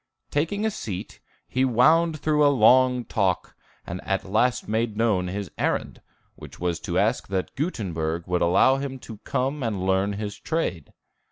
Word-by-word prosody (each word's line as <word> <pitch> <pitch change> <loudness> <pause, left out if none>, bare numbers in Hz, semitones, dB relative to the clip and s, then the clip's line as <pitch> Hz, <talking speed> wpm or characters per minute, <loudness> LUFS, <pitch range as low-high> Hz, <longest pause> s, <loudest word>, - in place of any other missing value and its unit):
Taking 165 +9 0
a 220 - +1
seat, 100 - -6 0.3
he 130 - 0
wound 155 +7 +4
through 150 0 +2
a 145 - +6
long 125 0 +4
talk, 95 -5 -1 0.3
and 90 +2 -6
at 95 -1 -1
last 110 +6 +1
made 110 0 -1
known 105 -6 +1
his 100 +1 -5
errand, - - -1 0.3
which - - -12
was 85 -1 -1
to - - -3
ask - - +1
that 95 -1 -3
Gutenberg 85 - -2
would 90 0 -1
allow 90 +10 +4
him 135 -1 -4
to 115 -4 -10
come 135 +6 -2
and 105 -6 -2
learn 95 +2 +1
his 105 0 -5
trade. 95 - -3
110 Hz, 165 wpm, -25 LUFS, 95-135 Hz, 0.3 s, a